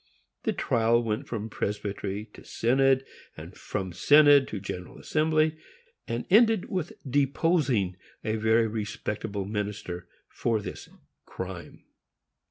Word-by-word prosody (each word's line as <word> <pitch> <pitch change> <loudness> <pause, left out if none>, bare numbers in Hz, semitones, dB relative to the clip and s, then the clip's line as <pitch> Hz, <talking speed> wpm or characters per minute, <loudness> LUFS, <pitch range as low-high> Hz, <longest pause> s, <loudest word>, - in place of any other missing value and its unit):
The - - +1
trial 115 +1 +2
went 115 +5 -2
from 110 -2 -4
Presbytery 105 -1 -3
to - - -13
Synod, 135 +2 +2 0.3
and - - -10
from 95 -2 -4
Synod 145 - +6
to 105 - -5
General 90 -2 -7
Assembly; 155 0 +1 0.5
and 115 0 -3
ended 220 -1 +5
with 180 -3 -2
deposing 135 - +1 0.3
a 110 0 -1
very 110 +1 +3
respectable 105 -2 -3
minister 100 -4 -4 0.2
for 115 -2 -1
this 105 - -8 0.4
crime. 95 -2 -7
115 Hz, 115 wpm, -27 LUFS, 100-140 Hz, 0.5 s, Synod